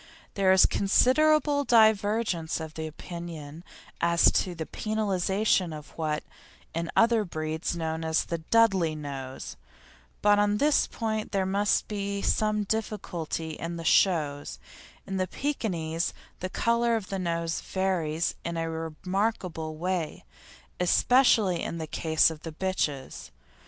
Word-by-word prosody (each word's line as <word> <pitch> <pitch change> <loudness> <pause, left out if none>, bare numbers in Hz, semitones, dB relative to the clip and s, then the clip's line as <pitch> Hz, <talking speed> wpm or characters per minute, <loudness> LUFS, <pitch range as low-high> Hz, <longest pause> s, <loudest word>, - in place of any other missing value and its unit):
There 195 -2 +3
is 190 -1 +7
considerable 285 +7 +3
divergence 215 - +2
of 160 0 -7
opinion 160 -1 -7 0.4
as 170 0 +5
to 180 -2 0
the 160 -1 -4
penalisation 195 -4 0
of 150 - -13
what, 155 -2 -2 0.5
in 165 +1 -3
other 230 -1 +4
breeds, 160 -3 -4
is - - -5
known 160 0 -3
as 160 0 +1
a 170 - -1
"Dudley" 190 -3 +3
nose, 135 -3 -7 0.7
but 205 0 +5
on 205 0 +2
this 295 +5 +3
point 220 -2 -3
there 195 -2 +1
must 200 +2 +1
be 200 -1 -3
some 215 -1 +1
difficulty 180 -7 -3
at 165 0 -5
shows; 145 - +2 0.5
in 195 - -4
the 185 0 0
Pekinese 175 - -2 0.2
the 185 - -4
colour 235 +3 +1
of 215 -4 -4
the 195 - -3
nose 170 -2 -2
varies 175 -4 -1
in 170 0 -3
a 165 0 -2
remarkable 165 0 -3
way, 175 -1 -3 0.5
especially 200 -1 +4
in 170 - -4
the 160 - -4
case 160 +1 +2
of 155 -1 -9
the 165 - -6
bitches. 150 - -3
180 Hz, 130 wpm, -27 LUFS, 160-210 Hz, 0.7 s, is